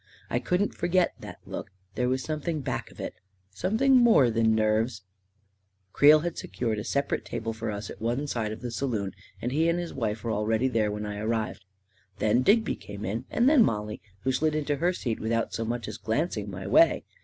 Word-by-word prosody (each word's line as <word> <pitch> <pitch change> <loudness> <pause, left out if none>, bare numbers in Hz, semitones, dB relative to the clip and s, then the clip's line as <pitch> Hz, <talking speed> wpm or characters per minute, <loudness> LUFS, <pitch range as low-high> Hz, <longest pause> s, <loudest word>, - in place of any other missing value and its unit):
I - - +2
couldn't 180 +3 0
forget 175 +1 +1
that - - -9
look - - -6
— 95 +1 -40
there 125 0 0
was 130 0 0
something 155 0 -2
back - - -3
of - - -17
it - - -4 0.3
— 95 +1 -42
something 265 +6 +4
more 225 - +6
than 110 -1 +3
nerves... 110 0 +1 0.9
Creel 150 +1 +7
had 170 0 -3
secured 110 +2 -2
a - - -4
separate 140 +4 -1
table 115 0 -4
for 110 - -4
us 105 0 -5
at - - -11
one 120 +5 -1
side 115 -6 -2
of 110 - -7
the 120 -1 -4
saloon, 115 -6 -2 0.3
and 120 - -1
he 160 +4 +2
and 170 - +1
his 175 -1 -4
wife 110 -3 -2
were 115 - -1
already 110 +4 +1
there 115 -4 +1
when 105 0 -4
I 105 0 -5
arrived. 110 -3 -2 0.5
Then 110 +4 +3
Digby 215 - +3
came 100 +1 -8
in, 115 +5 -3
and 240 - +2
then 290 -3 +6
Mollie, 105 - -2 0.2
who 130 - +1
slid 155 +4 +1
into 145 -1 0
her 175 +5 +2
seat 120 -10 -3
without 115 +1 -1
so 115 - -2
much 120 +1 -3
as 105 0 -6
glancing 110 - -1
my 95 0 -7
way. - - +5
115 Hz, 210 wpm, -27 LUFS, 110-150 Hz, 0.9 s, Creel